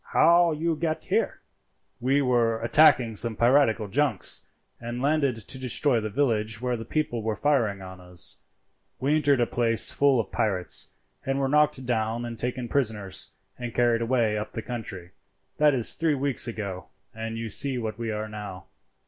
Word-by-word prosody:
How 170 0 +5
you 160 +2 -1
get 160 0 -2
here?" - - -1 0.6
"We 135 +3 +1
were 120 -3 +1
attacking 120 -3 +4
some 115 +1 +1
piratical 120 -2 +3
junks, 115 - 0 0.3
and 120 +1 -6
landed 140 -1 +1
to 115 +4 -4
destroy 130 0 +2
the 110 0 -4
village 110 -4 0
where 125 0 -1
the 115 -1 -7
people 120 -3 -2
were 110 0 -2
firing 110 -7 0
on 95 -1 -10
us. 90 -1 -3 0.6
We 140 +3 +1
entered 145 -3 +2
a 120 - +3
place 115 -1 +2
full 140 -3 +3
of 105 - -3
pirates, 95 -4 0 0.3
and 135 0 -1
were 135 -1 0
knocked 150 -2 +2
down 115 0 -1
and 115 -1 -7
taken 125 0 -3
prisoners, 105 -8 -2 0.3
and 120 -2 -6
carried 120 -1 +2
away 115 -3 +1
up 105 - -7
the 115 - -5
country; 100 -7 -7 0.5
that 150 -2 +4
is 120 -3 +6
three 160 -2 0
weeks 135 -3 0
ago, 100 -5 -6 0.3
and 115 0 -5
you 115 0 -4
see 130 +5 +2
what 110 -2 -5
we 115 -1 -3
are 110 0 -3
now." 105 -4 -8
120 Hz, 175 wpm, -26 LUFS, 110-135 Hz, 0.6 s, is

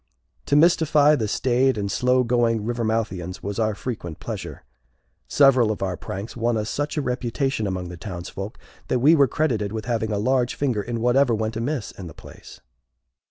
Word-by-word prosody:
To 145 - +2
mystify 155 -2 +5
the 110 -6 -1
staid 130 +3 +1
and 100 -1 -2
slow 125 +4 +2
going 115 -3 +1
Rivermouthians 110 -6 -2
was 100 +2 -4
our 110 -2 +1
frequent 100 -10 -6
pleasure. - - -7 0.6
Several 130 -6 +4
of 105 - -4
our 95 -2 -1
pranks 100 +5 -7
won 120 -1 0
us 105 +1 -3
such 145 +2 -3
a 150 - 0
reputation 125 -2 -1
among 90 -2 -4
the 90 - -8
townsfolk, 95 +3 -7 0.3
that - - +1
we 145 +7 +5
were 140 -3 +5
credited 115 -11 -1
with 110 0 -5
having 110 -3 -1
a 105 - 0
large 125 +3 +1
finger 125 -7 0
in 115 +2 -4
whatever 125 0 +3
went 110 +1 -2
amiss 120 +2 -3
in 95 - -9
the 80 - -11
place. - - -13
115 Hz, 180 wpm, -23 LUFS, 105-130 Hz, 0.6 s, mystify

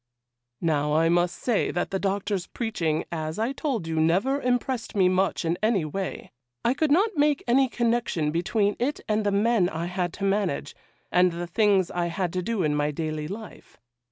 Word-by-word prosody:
'Now 150 -2 +1
I 165 +1 +3
must 175 +1 +2
say 235 -5 0
that 175 - -2
the 195 - -1
Doctor's 195 -1 -1
preaching, 170 -10 -2
as 155 -1 -3
I 225 +4 0
told 265 - -2
you, 160 -1 -1
never 195 - +2
impressed 245 -1 -1
me 190 -2 +4
much 185 -1 +1
in 165 +1 0
any 215 -6 +2
way. 190 +5 -5 0.3
I 240 - +4
could 310 +2 0
not 390 +7 +3
make 290 -1 +2
any 260 +2 +4
connection 230 -11 0
between 200 +5 +1
it 275 +5 -1
and 215 0 +1
the 205 - +1
men 205 -2 +2
I 165 +1 -3
had 180 0 -2
to 200 - -7
manage, 195 -8 0 0.4
and 180 0 +4
the 170 +1 -4
things 195 0 +2
I 175 -1 -1
had 175 0 -2
to 185 - -1
do 205 0 -1
in 150 -1 +1
my 150 0 +1
daily 155 0 -3
life. 215 +5 -9
190 Hz, 190 wpm, -26 LUFS, 165-230 Hz, 0.4 s, me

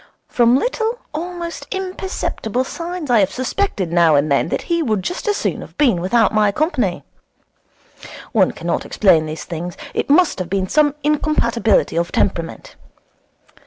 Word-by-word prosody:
From 240 +1 +3
little, 460 - -1 0.2
almost 335 -2 -5
imperceptible 370 - -3
signs 335 0 -5
I 235 - +5
have 195 -2 +2
suspected 255 - -2
now 170 -3 +5
and 145 +1 +1
then 140 +3 +2
that - - -2
he 335 -1 0
would 215 - 0
just 360 - -4
as 415 -1 +1
soon - - -2
have - - -12
been 240 -12 +3
without 215 +4 +2
my 210 -1 +3
company. 255 - -1 1.3
One - - +3
cannot - - -3
explain 165 -6 +3
these 155 0 -6
things. 170 +2 -6 0.2
It - - -2
must 310 - +4
have 180 -2 -4
been 190 -1 -1
some 295 +4 +2
incompatibility 240 - +1
of 170 +1 0
temperament. 170 -4 -2
240 Hz, 155 wpm, -19 LUFS, -, 1.3 s, I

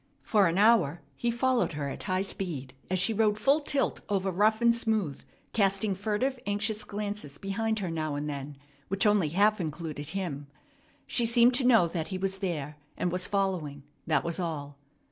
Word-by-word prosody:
For 205 -4 +4
an 170 +2 0
hour 195 -8 +4
he 240 - -1
followed 240 -3 +1
her 145 -1 -3
at 140 - -6
high 185 -1 0
speed 165 -10 -5 0.2
as 185 - +1
she 185 +5 +2
rode 210 -1 +2
full 275 +8 +3
tilt 285 -2 -1
over 195 -1 0
rough 215 +4 +3
and 235 0 +4
smooth, 215 - -1 0.3
casting 195 0 +2
furtive, 220 +7 -1
anxious 205 +1 0
glances 205 -8 -5
behind 220 +4 -1
her 185 -5 -2
now 155 -2 -2
and 145 +1 -3
then, 140 -1 -5 0.3
which 195 +2 0
only 205 -7 +3
half 205 +5 +3
included 155 -2 -5
him. 160 -7 -4 0.6
She 235 -2 +3
seemed 235 +1 +5
to 250 0 +2
know 225 -9 +6
that 165 -1 -3
he 185 - -4
was 195 +1 -2
there 150 -6 -3 0.2
and 180 - 0
was 180 +1 -1
following; 180 -8 -1 0.2
that 155 -4 +2
was 170 +1 -2
all. 150 -5 -4
195 Hz, 185 wpm, -29 LUFS, 160-215 Hz, 0.6 s, know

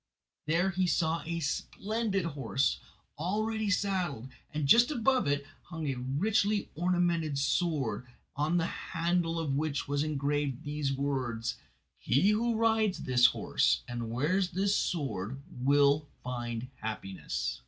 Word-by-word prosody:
There 175 +5 +2
he 185 0 +1
saw 165 -1 +1
a 170 0 -2
splendid 200 +6 -1
horse, 135 -4 0 0.4
all 190 +7 0
ready 220 -1 -1
saddled, 180 - -1 0.2
and 150 -2 -1
just 235 +10 +7
above 260 - +2
it 145 0 0 0.2
hung 160 -2 -6
a 140 - 0
richly 200 +10 +1
ornamented 170 -3 +1
sword 140 -6 0 0.3
on 155 +4 +1
the 165 - +1
handle 170 -1 -1
of 155 -4 -1
which 145 0 -1
was 145 0 0
engraved 145 -3 -1
these 145 -1 -2
words: 130 -4 -2 0.4
"He 140 - +3
who 230 +2 +1
rides 220 -3 +2
this 125 -1 +6
horse - - +1
and 120 -2 -4
wears 170 +11 +1
this 195 +3 +1
sword 130 - -2
will 140 +3 +3 0.2
find 120 -1 -4
happiness." 105 -3 -4
155 Hz, 130 wpm, -30 LUFS, 135-185 Hz, 0.4 s, just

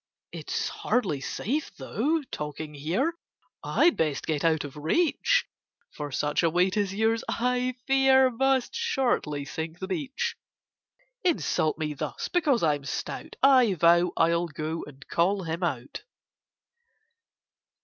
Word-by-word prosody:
"It's - - -3
hardly 190 - -1
safe, 280 - -3
though, 300 +8 -1
talking 150 +1 -5
here— 175 - -1 0.5
I'd 345 - +3
best 150 -3 0
get 155 -3 -1
out 160 -2 +2
of 145 -2 -8
reach: 335 - +2 0.5
For 145 -1 -6
such 145 +2 0
a 165 - +3
weight 180 +3 +2
as 205 -3 0
yours, 220 +3 +1
I 250 +1 0
fear, 265 -1 +5
Must 265 +1 +1
shortly 255 - 0
sink 160 +2 -5
the 190 - -5
beach!"— 285 - -2 0.9
Insult 315 - +1
me 155 -1 -2
thus 145 - -4
because 295 - +2
I'm 145 -3 +1
stout! 140 - -5
I 255 -7 +6
vow 170 +2 +4
I'll 170 +1 +2
go 160 +1 -4
and 140 -1 -14
call 190 +3 +1
him 165 +1 -4
out! 135 -7 -3
180 Hz, 130 wpm, -27 LUFS, -, 0.9 s, I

